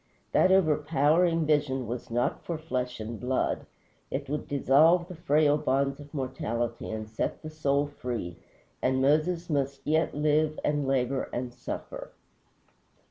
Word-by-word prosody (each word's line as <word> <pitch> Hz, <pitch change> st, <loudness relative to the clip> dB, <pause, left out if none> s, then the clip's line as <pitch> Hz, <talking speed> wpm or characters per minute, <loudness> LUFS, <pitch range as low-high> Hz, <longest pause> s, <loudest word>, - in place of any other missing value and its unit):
That 185 Hz, -, +4 dB
overpowering 160 Hz, -1 st, +3 dB
vision 145 Hz, -4 st, +1 dB
was 120 Hz, +2 st, -5 dB
not 120 Hz, +1 st, -1 dB
for 170 Hz, -, -3 dB
flesh 125 Hz, -6 st, -3 dB
and 110 Hz, +1 st, -5 dB
blood; 130 Hz, +1 st, -1 dB, 0.4 s
it 140 Hz, +1 st, -3 dB
would 150 Hz, +2 st, -3 dB
dissolve 155 Hz, +5 st, +4 dB
the 180 Hz, -, -8 dB
frail 150 Hz, -2 st, +3 dB
bonds 140 Hz, +1 st, 0 dB
of 145 Hz, 0 st, -12 dB
mortality 120 Hz, -4 st, -3 dB
and 110 Hz, -1 st, -4 dB
set 110 Hz, +8 st, -3 dB
the 155 Hz, -, -6 dB
soul 145 Hz, -2 st, +1 dB
free, 125 Hz, -11 st, -5 dB, 0.5 s
and 130 Hz, 0 st, +1 dB
Moses 155 Hz, +5 st, +2 dB
must 140 Hz, -3 st, -2 dB
yet 160 Hz, +1 st, +1 dB
live, 150 Hz, +1 st, +1 dB
and 145 Hz, -2 st, 0 dB
labor, 135 Hz, 0 st, 0 dB
and 120 Hz, 0 st, -4 dB
suffer. -, -, -7 dB
145 Hz, 140 wpm, -28 LUFS, 130-155 Hz, 0.5 s, That